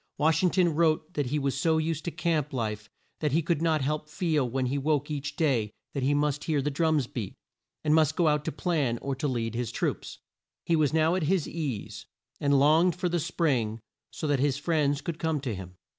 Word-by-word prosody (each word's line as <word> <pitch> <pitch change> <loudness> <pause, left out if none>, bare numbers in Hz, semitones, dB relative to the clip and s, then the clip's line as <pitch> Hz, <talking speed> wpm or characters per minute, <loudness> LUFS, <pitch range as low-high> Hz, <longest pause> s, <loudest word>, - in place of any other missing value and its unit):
Wash 160 +1 +3
ing 185 - +4
ton 180 -1 +3
wrote 160 +1 +1
that 145 -5 -1
he 145 +4 -1
was 140 -2 -1
so 160 +3 +2
used 160 0 -1
to - - 0
camp 155 -3 -1
life 105 -4 -3 0.3
that 150 -3 0
he 165 +2 +2
could 165 -1 0
not 160 -4 +2
help 150 +2 -2
feel 155 -6 0
when 130 +2 -1
he 130 +3 -1
woke 145 0 0
each 150 0 -4
day 130 -9 +1 0.2
that 140 - -2
he 140 +3 +2
must 145 0 0
hear 155 -3 +1
the 145 +2 -1
drums 155 -2 +2
beat, 115 -5 -6 0.5
and 150 - +3
must 155 -1 +3
go 170 -3 +2
out 150 -1 +2
to - - -1
plan 145 -6 0
or 140 - -3
to 135 +3 -2
lead 115 -4 -2
his 120 -1 -2
troops. - - -3 0.5
He 170 - +2
was 155 -3 +2
now 160 +1 +3
at 185 - 0
his 185 -5 +1
ease, 145 -11 -5 0.3
and 140 -1 +3
longed 160 +5 +4
for 180 0 -1
the 175 0 0
spring 140 -10 0 0.3
so - - -6
that 145 -3 +1
his 140 0 +1
friends 150 -2 +1
could 170 -2 -5
come 160 -2 0
to 130 -5 -3
him. 90 -2 -8
150 Hz, 225 wpm, -28 LUFS, 135-160 Hz, 0.5 s, ing